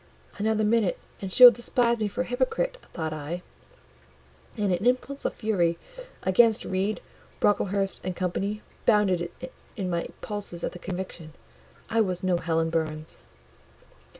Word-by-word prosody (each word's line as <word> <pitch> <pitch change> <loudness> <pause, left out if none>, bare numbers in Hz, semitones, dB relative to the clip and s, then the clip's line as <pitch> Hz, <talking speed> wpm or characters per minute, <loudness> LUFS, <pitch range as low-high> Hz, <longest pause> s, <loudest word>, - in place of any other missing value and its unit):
"Another 215 +1 +1
minute, 215 -3 +2 0.2
and 190 -1 -4
she 250 - +6
will 245 - +14
despise 235 0 +1
me 215 - +1
for 230 +5 -3
a - - -1
hypocrite," 260 - 0 0.2
thought 160 -2 -3
I; 155 +4 -5 1.1
and 205 -3 +1
an 175 +2 -1
impulse 255 +3 0
of - - -1
fury 175 -7 +1 0.5
against 220 +4 +4
Reed, 195 +3 -1 0.4
Brocklehurst, 200 -1 +1
and 185 -1 -3
Co. 180 0 -1 0.5
bounded 185 -6 +3 0.5
in 185 -4 -2
my 170 -1 -1
pulses 200 -5 -5
at - - -1
the 180 - -10
conviction. 180 -4 -6 0.5
I 230 0 +2
was 185 -3 -1
no 185 -2 +2
Helen 165 -1 0
Burns. 155 -1 -3
190 Hz, 145 wpm, -27 LUFS, 175-220 Hz, 1.1 s, will